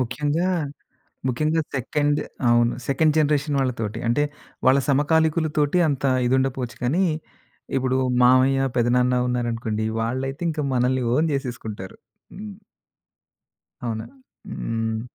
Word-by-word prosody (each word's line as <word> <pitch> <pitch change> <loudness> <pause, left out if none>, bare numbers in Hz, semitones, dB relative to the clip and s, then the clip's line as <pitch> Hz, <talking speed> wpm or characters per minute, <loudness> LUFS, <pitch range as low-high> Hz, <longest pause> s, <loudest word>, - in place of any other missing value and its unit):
ముఖ్యంగా, 145 +7 0 0.8
ముఖ్యంగా 155 +6 +1
సెకండ్ 145 +3 0 0.3
అవును. 120 0 +4
సెకండ్ 150 +3 +2
జనరేషన్ 145 -1 +1
వాళ్ళ 130 -1 +1
తోటి. 110 +1 -3
అంటే, 120 +5 +2 0.4
వాళ్ళ 130 +2 +6
సమకాలికులు 160 +3 +2
తోటి 150 +4 +2
అంత 140 -1 -2 0.2
ఇది 130 - +3
ఉండకపోవచ్చు 130 -2 -2
కానీ. 160 +10 +2 0.7
ఇప్పుడు 130 0 0 0.3
మామయ్య, 130 +2 +5 0.2
పెదనాన్న 125 +1 +3
ఉన్నారనుకోండి 115 -3 -2 0.2
వాళ్ళైతే 130 +5 -3
ఇంకా 155 -1 -2
మనల్ని 125 +1 +1
ఓన్ 155 +4 +2
చేసేసుకుంటారు. 115 -8 -5 0.4
హ్మ్. 205 0 -9 1.3
అవునా? 110 -2 -3 0.4
హ్మ్. 115 - -3
130 Hz, 110 wpm, -23 LUFS, 120-150 Hz, 1.3 s, వాళ్ళ